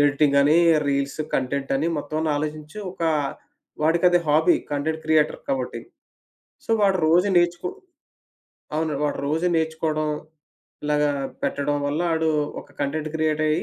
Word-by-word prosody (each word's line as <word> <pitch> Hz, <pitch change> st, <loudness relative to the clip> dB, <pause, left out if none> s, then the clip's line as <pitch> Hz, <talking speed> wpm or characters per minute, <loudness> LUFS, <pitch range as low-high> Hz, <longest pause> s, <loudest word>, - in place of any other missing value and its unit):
Editing 145 Hz, 0 st, +3 dB
అని, 150 Hz, +3 st, +4 dB, 0.3 s
reels, 140 Hz, +1 st, -1 dB, 0.2 s
కంటెంటని 135 Hz, +3 st, 0 dB
మొత్తమన్ని 155 Hz, +2 st, -2 dB
ఆలోచించి, 155 Hz, +4 st, -5 dB
ఒక 175 Hz, -, -9 dB, 0.8 s
వాడికది 170 Hz, +3 st, +4 dB
హాబీ. 155 Hz, +2 st, +4 dB, 0.2 s
కంటెంట్ 160 Hz, +2 st, -2 dB
క్రియేటర్ 155 Hz, -1 st, +2 dB
కాబట్టి. 125 Hz, -3 st, -2 dB, 0.9 s
సో -, -, -26 dB
వాాడు 195 Hz, -2 st, +4 dB
రోజు 175 Hz, +5 st, +4 dB
నేర్చుకో 175 Hz, -, +1 dB, 1.1 s
అవును. 160 Hz, 0 st, 0 dB
వాడు 145 Hz, -, -1 dB
రోజు 160 Hz, +4 st, 0 dB
నేర్చుకోవడం. 160 Hz, -1 st, -1 dB, 0.8 s
ఇలాగా 150 Hz, 0 st, +2 dB, 0.3 s
పెట్టడం 145 Hz, +1 st, 0 dB
వల్ల 145 Hz, +3 st, -1 dB
ఆడు 160 Hz, 0 st, +1 dB, 0.3 s
ఒక -, -, -16 dB
కంటెంట్ 155 Hz, +2 st, -2 dB
క్రియేటయ్యి, 155 Hz, -1 st, +1 dB
155 Hz, 120 wpm, -23 LUFS, 145-160 Hz, 1.1 s, అని